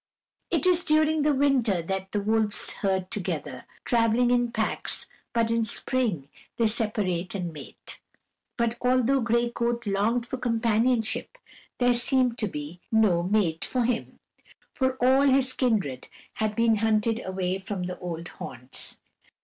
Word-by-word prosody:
It - - 0
is 360 -1 +5
during 310 0 +3
the 300 +1 +3
winter 260 - +2
that 190 +2 -4
the 205 - -1
wolves 215 0 +1
herd 190 -2 -2
together, 200 -4 -4 0.2
traveling 235 0 +3
in 245 -1 +2
packs, 220 -2 -2 0.3
but 230 -1 +1
in 230 0 +2
spring 220 - -1 0.3
they 230 - +2
separate 210 -5 0
and 175 -4 -4
mate. 145 -3 -10 0.6
But 235 0 0
although 255 +1 +2
Gray 235 +1 +1
Coat 235 0 -2
longed 215 +4 0
for 260 - -5
companionship, 230 - 0 0.4
there 245 0 +3
seemed 245 0 +2
to 215 - 0
be 150 0 -7
no 215 -6 +3
mate 180 -3 0
for 250 -1 0
him, 235 -1 -2 0.6
for 260 -1 +1
all 260 +1 +3
his 260 -1 +3
kindred 200 - -1 0.3
had 215 -1 -2
been 230 -1 +3
hunted 220 +1 +1
away 185 0 -2
from 190 -1 -4
the 180 0 -5
old 170 -1 -5
haunts. 125 +1 -5
225 Hz, 145 wpm, -26 LUFS, 190-245 Hz, 0.6 s, is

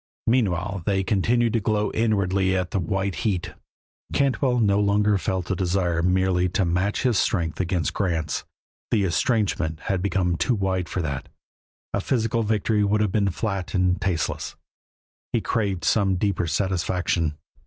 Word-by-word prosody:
Meanwhile 100 -5 +1
they 95 -1 +2
continued 115 +4 +1
to 115 - +2
glow 105 0 0
inwardly 100 -4 +1
at 90 -1 -3
a 100 - +1
white 95 +3 -1
heat. 95 -6 -1 0.6
Cantwell 130 -2 +1
no 100 -3 +3
longer 105 0 +2
felt 95 -1 -2
the 95 - -1
desire 90 -2 0
merely 90 0 +2
to 95 +2 +1
match 90 +4 0
his 125 -6 +2
strength 80 -6 0
against 90 -2 0
Grant's; 80 -6 -1 0.5
the 105 -3 +2
estrangement 95 - 0
had 95 -2 -1
become 90 -2 0
too 125 - +1
wide 95 -4 -1
for 90 +4 -2
that; 70 -4 -4 0.6
a - - 0
physical 115 -2 0
victory 105 0 +1
would 105 +1 +2
have 105 -3 +1
been 100 0 +2
flat 95 0 -3
and 90 +1 +2
tasteless; 95 -4 -2 0.8
he - - +3
craved 100 -6 -1
some 95 +1 +3
deeper 90 -2 0
satisfaction. 85 -2 0
95 Hz, 155 wpm, -24 LUFS, 90-105 Hz, 0.8 s, no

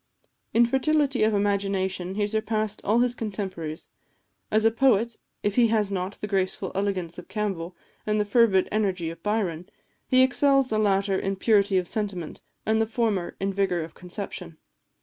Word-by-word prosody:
In 235 +1 +5
fertility 275 +1 +1
of 215 0 +3
imagination 195 -2 0
he 205 0 +1
surpassed 215 0 -1
all 225 +4 +3
his 245 -1 +2
contemporaries. 190 -8 -5 0.6
As 215 +1 +2
a 225 - +5
poet, 230 -2 +2 0.3
if 205 +2 -1
he 240 -2 +6
has 215 -3 +1
not 190 0 -2
the - - -3
graceful 190 -1 -1
elegance 185 -4 -2
of - - -11
Campbell, 190 -5 -3 0.3
and 210 0 +1
the 210 - +1
fervid 205 -3 +4
energy 190 -6 0
of 165 - -12
Byron, 195 -5 -2 0.4
he 255 0 +5
excels 270 0 +3
the 215 - +1
latter 195 -2 +2
in 195 0 -2
purity 200 -1 +3
of 180 -1 0
sentiment, 195 -7 -4 0.2
and 220 0 +2
the 220 - +1
former 220 -5 -1
in 195 0 -1
vigour 190 -3 0
of 160 0 -7
conception. 180 -2 -7
205 Hz, 170 wpm, -26 LUFS, 190-220 Hz, 0.6 s, he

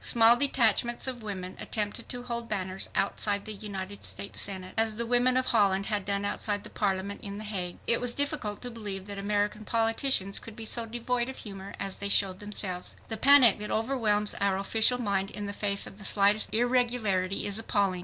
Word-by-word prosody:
Small 230 0 +6
detachments 240 -3 +2
of 250 -2 -4
women 185 -4 -5
attempted 215 +1 -2
to 245 -1 -4
hold 235 -1 -4
banners 190 -2 -3
outside 200 +1 0
the 215 - -5
United 200 -1 -7
States 200 - -2
Senate, 185 -2 0
as 220 -1 +1
the 235 +2 -1
women 245 +2 +3
of 255 - +1
Holland 200 -5 +2
had 210 -2 -2
done 200 0 -1
outside 205 0 -2
the - - -11
Parliament 200 0 -2
in 200 0 -6
the 215 - -7
Hague. 185 -4 -4
It 235 - +1
was 245 -1 +2
difficult 285 -8 -1
to 245 - -4
believe 205 -4 -6
that 200 -1 -6
American 210 +1 -1
politicians 225 -2 +1
could 225 - -11
be 225 -1 -7
so 230 +1 +1
devoid 240 +2 -2
of 265 - -7
humor 195 -2 -8
as 195 -1 -3
they 200 - -3
showed 195 -2 +2
themselves. 200 -3 -4
The 225 - -1
panic 260 -3 +7
that 210 - -5
overwhelms 220 -3 +1
our 200 -1 +2
official 220 +5 +2
mind 195 -4 -1
in 205 - -6
the 200 - -4
face 200 -1 0
of 195 - -11
the - - -9
slightest 205 +2 +3
irregularity 230 -6 +1
is 205 +1 -2
appalling! 200 -4 0
210 Hz, 200 wpm, -28 LUFS, 200-235 Hz, -, panic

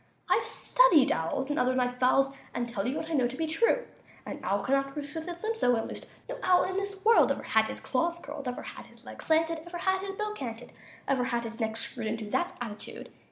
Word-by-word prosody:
"I've - - +4
studied 335 - +4
owls, 265 - -1
And 290 - 0
other 255 +1 +2
night 250 -1 0
fowls, 270 +2 +4 0.2
And 240 0 -1
I - - -9
tell 200 -2 -2
you 265 - -1
What 320 - -4
I - - -1
know 260 -5 +3
to 250 - -7
be 325 - 0
true; 460 +10 +2 0.4
An - - -6
owl 195 +2 0
can 260 - 0
not 275 0 +1
roost 290 0 -5
With 320 +1 -5
his 345 +1 -6
limbs 450 +1 -1
so 245 - +4
unloosed; 225 - -4 0.2
No - - -5
owl 365 -1 +5
in 370 - -2
this 395 0 -3
world 455 +1 +6
Ever - - -2
had 220 0 +3
his - - -6
claws 335 +6 0
curled, 285 -4 -7
Ever 250 - -4
had - - -9
his - - -19
legs - - -9
slanted, 325 +1 +3
Ever 345 0 -5
had 380 +2 +1
his 390 0 -5
bill 425 +1 -2
canted, 240 - -6 0.4
Ever 260 -2 +2
had 240 -2 -1
his 230 0 -6
neck 220 -1 -1
screwed 230 -1 -3
Into 220 0 -3
that 350 - 0
attitude. 215 -4 -7
275 Hz, 250 wpm, -29 LUFS, 240-345 Hz, 0.4 s, world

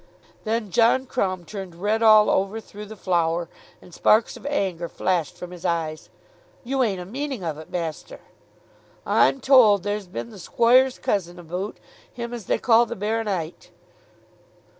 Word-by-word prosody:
Then 220 -2 -2
John 235 +5 +3
Crumb 185 -9 -2
turned 190 -1 -8
red 210 +5 -1
all 215 -1 +7
over, 195 +3 0
through 210 -1 -11
the 220 - -9
flour, 170 -3 0 0.4
and 180 - -16
sparks 220 +2 +3
of - - -9
anger 185 - -2
flashed 180 -1 -1
from 180 0 -8
his 180 -1 -11
eyes. 160 -2 -2 0.5
"You 265 +2 -1
ain't 205 -7 0
a 180 - -7
meaning 265 +1 -5
of 155 -3 -4
it, 155 - -11
master?" 170 - -5 0.9
"I'm 270 - +3
told 230 -8 +5
there's 205 -1 -3
been 210 +5 -6
the 205 - -12
squoire's 245 +7 +3
cousin 180 -3 -2
aboot, 180 +4 -5 0.3
him 235 -1 -6
as 230 -6 -7
they - - +2
call 235 0 +4
the 235 - -5
baronite." 205 -5 -3
205 Hz, 160 wpm, -23 LUFS, 175-230 Hz, 0.9 s, all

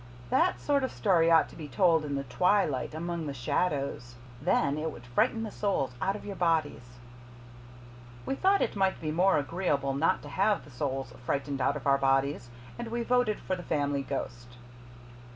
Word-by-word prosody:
"That 355 +2 +2
sort 285 -2 +1
of 260 - -1
story 170 -6 +3
ought 165 -1 +5
to - - -14
be 155 -3 -7
told 160 +3 +3
in 145 -2 -3
the 140 - -2
twilight 155 -1 +1
among 170 -1 -3
the 140 - -4
shadows. 135 -2 -2 0.3
Then 145 -2 +1
it 160 +1 -2
would 120 -3 -12
frighten 125 - +1
the 215 - -5
souls 195 - -1
out 195 +1 0
of 210 - -9
your 200 -1 -5
bodies." 150 -8 -1 1.3
We - - -1
thought 385 +7 +3
it - - -2
might 190 -1 +1
be 155 -1 -3
more 185 +4 +3
agreeable 145 -2 -1
not 145 +4 +1
to 145 - -9
have 200 +8 +1
the 145 - -15
souls 135 -1 -3
frightened 140 +1 -2
out 140 - +2
of 145 - -6
our 140 -1 +4
bodies, 135 -2 +1 0.3
and 235 - -4
we 235 +1 -2
voted 245 -3 +1
for 185 - -2
the 180 - -7
Family 145 -4 -1
Ghost. 120 -2 -6
155 Hz, 190 wpm, -29 LUFS, 135-190 Hz, 1.3 s, ought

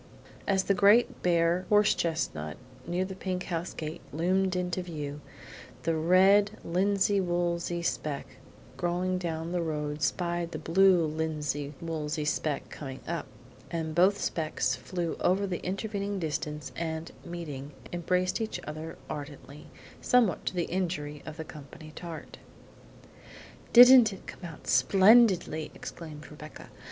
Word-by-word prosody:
As 190 -1 +2
the 200 - +2
great 205 +5 +4
bare 170 +1 +2
horse 210 -1 +5
chestnut 80 - -2 0.3
near 180 +2 0
the 190 - -6
pink 185 -1 -3
house 170 0 -3
gate 155 +2 -6
loomed 185 +5 +1
into 180 0 -1
view, 150 -4 -6 0.6
the 165 0 +1
red 195 +6 +4
linsey 195 +3 +2
woolsey 175 -1 -1
speck 150 -4 -2 0.5
going 180 +3 0
down 165 -1 -3
the 175 -1 0
road 150 -2 -3
spied 175 0 -1
the - - -3
blue 175 +2 +4
linsey 150 -2 -3
woolsey 155 -2 -3
speck 150 -1 -1
coming 135 -3 -7
up, 170 -2 -3 0.4
and 160 -2 -3
both 190 +5 +4
specks 155 -5 -1
flew 170 +6 -4
over 190 +2 +2
the 185 -3 -4
intervening 200 +1 -3
distance 150 -3 -3
and, 160 0 -4
meeting, 150 -5 -6 0.2
embraced 180 +4 0
each 220 - -3
other 155 +1 -7
ardently, 145 0 -8 0.3
somewhat 240 -7 +2
to - - -1
the 175 - +1
injury 165 -5 -3
of 155 +1 -7
the 160 - -5
company 155 +1 -11
tart. 165 -3 -8 1.3
"Didn't 245 -2 +9
it 195 - -10
come 180 - -9
out 165 -3 -10
splendidly?" 185 - +4
exclaimed 150 -4 -9
Rebecca. 150 +1 -11
170 Hz, 135 wpm, -29 LUFS, 155-185 Hz, 1.3 s, Didn't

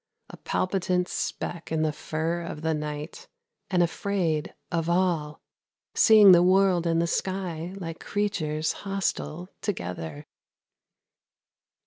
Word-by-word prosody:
A - - -11
palpitant 185 -1 0
speck 175 -2 -4
in 160 -1 +1
the 155 - +1
fur 160 +3 -2
of 165 -2 -7
the 160 0 +1
night, 150 +1 -5 0.4
and 180 -2 +3
afraid 170 -3 -1 0.2
of 165 -1 -1
all, 170 -4 0 0.5
Seeing 215 -3 +8
the 175 -1 +8
world 185 -1 +4
and 165 0 +2
the 170 - +2
sky 180 -1 -2
like 165 -3 -6
creatures 160 -7 -1
hostile 190 -3 -3
together. 85 - -4
170 Hz, 115 wpm, -26 LUFS, 155-185 Hz, 0.5 s, Seeing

